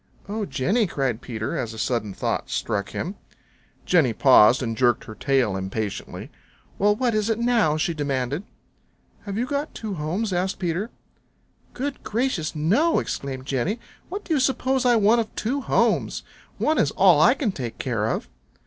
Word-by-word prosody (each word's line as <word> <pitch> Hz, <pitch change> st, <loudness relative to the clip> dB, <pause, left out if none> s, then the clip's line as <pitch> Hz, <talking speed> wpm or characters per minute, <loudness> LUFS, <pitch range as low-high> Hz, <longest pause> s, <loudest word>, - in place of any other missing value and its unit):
"Oh, 210 Hz, 0 st, -3 dB
Jenny," 190 Hz, -, +1 dB
cried 135 Hz, -7 st, -2 dB
Peter, 110 Hz, -3 st, -4 dB
as 115 Hz, -2 st, -3 dB
a -, -, -10 dB
sudden 115 Hz, -3 st, -1 dB
thought -, -, -2 dB
struck 100 Hz, -1 st, -2 dB
him. 190 Hz, +4 st, -5 dB, 0.7 s
Jenny 155 Hz, -10 st, +3 dB
paused 130 Hz, 0 st, +6 dB
and 115 Hz, -2 st, -2 dB
jerked 120 Hz, -1 st, +2 dB
her 110 Hz, -, -9 dB
tail 130 Hz, -4 st, +1 dB
impatiently. 95 Hz, +2 st, -5 dB, 0.5 s
"Well, 205 Hz, +1 st, +4 dB
what 245 Hz, +1 st, 0 dB
is 215 Hz, +1 st, 0 dB
it 225 Hz, -, +1 dB
now?" 230 Hz, -10 st, +2 dB
she 165 Hz, +2 st, 0 dB
demanded. 140 Hz, -1 st, -2 dB, 0.8 s
"Have 200 Hz, -1 st, -4 dB
you 240 Hz, -, 0 dB
got 285 Hz, +3 st, -3 dB
two 215 Hz, -3 st, -5 dB
homes?" 185 Hz, +6 st, -2 dB
asked 185 Hz, +2 st, -1 dB
Peter. 185 Hz, +4 st, -2 dB, 0.9 s
"Goodness 280 Hz, +2 st, -4 dB
gracious, 210 Hz, -10 st, -1 dB
no!" 210 Hz, -, +2 dB
exclaimed 130 Hz, -2 st, -3 dB
Jenny. 140 Hz, -, -1 dB, 0.3 s
"What 400 Hz, +3 st, -5 dB
do 330 Hz, -, -1 dB
you 295 Hz, -, +2 dB
suppose 260 Hz, 0 st, +1 dB
I 240 Hz, -, +5 dB
want 225 Hz, +2 st, +4 dB
of 220 Hz, -, -8 dB
two 265 Hz, +6 st, -1 dB
homes? -, -, +1 dB, 0.3 s
One 310 Hz, 0 st, +1 dB
is 140 Hz, -, +3 dB
all 175 Hz, -2 st, +5 dB
I 175 Hz, +11 st, +6 dB
can 245 Hz, -8 st, -1 dB
take 125 Hz, -9 st, -6 dB
care 115 Hz, -5 st, -1 dB
of." 115 Hz, -, -2 dB
175 Hz, 170 wpm, -24 LUFS, -, 0.9 s, paused